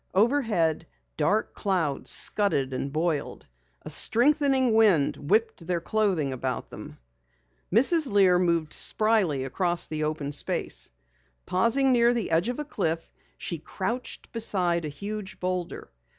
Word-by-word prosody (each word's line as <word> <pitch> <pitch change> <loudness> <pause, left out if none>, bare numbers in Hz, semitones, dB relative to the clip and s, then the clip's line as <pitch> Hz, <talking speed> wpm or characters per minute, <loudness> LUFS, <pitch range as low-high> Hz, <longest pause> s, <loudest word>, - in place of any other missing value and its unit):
Overhead, 205 - +1 0.3
dark 205 +8 0
clouds 175 -8 -1
scudded 140 -11 0
and 135 +2 -3
boiled; 155 0 -2 0.4
a - - -8
strengthening 270 -1 +3
wind 205 -10 +4
whipped 220 -5 +1
their 175 -1 0
clothing 180 -7 0
about 130 0 -4
them. - - -10 0.7
Mrs. 275 - +4
Lear 190 -3 +4
moved 170 -3 0
spryly 210 -11 +2
across 175 +5 -1
the 155 -1 -4
open 150 -2 -3
space. 145 - -2 0.6
Pausing 230 +9 +2
near 240 -1 +4
the 230 -7 -2
edge 170 +7 +2
of 245 - -3
a 300 - -4
cliff, 165 - -3 0.3
she 170 - -5
crouched 215 +10 -5
beside 180 -7 0
a - - -3
huge 200 +6 -7
boulder. 180 -1 -4
185 Hz, 130 wpm, -26 LUFS, 160-225 Hz, 0.7 s, wind